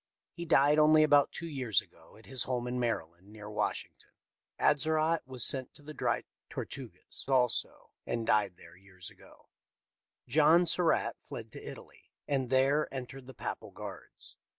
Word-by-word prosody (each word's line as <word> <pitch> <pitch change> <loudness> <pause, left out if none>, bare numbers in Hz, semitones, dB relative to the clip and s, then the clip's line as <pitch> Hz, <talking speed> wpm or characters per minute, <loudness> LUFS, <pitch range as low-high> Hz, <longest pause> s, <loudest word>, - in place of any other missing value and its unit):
He 170 - -6
died 150 -2 +4
only 155 0 +6
about 145 -2 +5
two 170 - -6
years 130 - +1
ago - - -14
at 110 - -17
his 130 -2 0
home 125 -2 -2
in 125 0 -2
Maryland, 95 -6 -3
near 105 -1 -10
Washington. 105 - -3 0.5
Atzerodt 155 +2 +2
was 130 -3 -2
sent 130 -3 0
to 145 - -9
the 155 +1 -9
Dry 120 -5 0 0.3
Tortugas 115 -10 -7
also, 125 -3 0 0.2
and 115 -1 -2
died 100 -5 +2
there - - -14
years 95 -1 -12
ago. - - -18 0.8
John 155 +6 +5
Surra.tt 175 -1 +1
fled - - -8
to - - -9
Italy, - - -11 0.2
and 135 -3 0
there 135 +3 +2
entered 130 0 -7
the 130 - -11
Papal - - -5
guards. - - -9
130 Hz, 155 wpm, -31 LUFS, 115-150 Hz, 0.8 s, only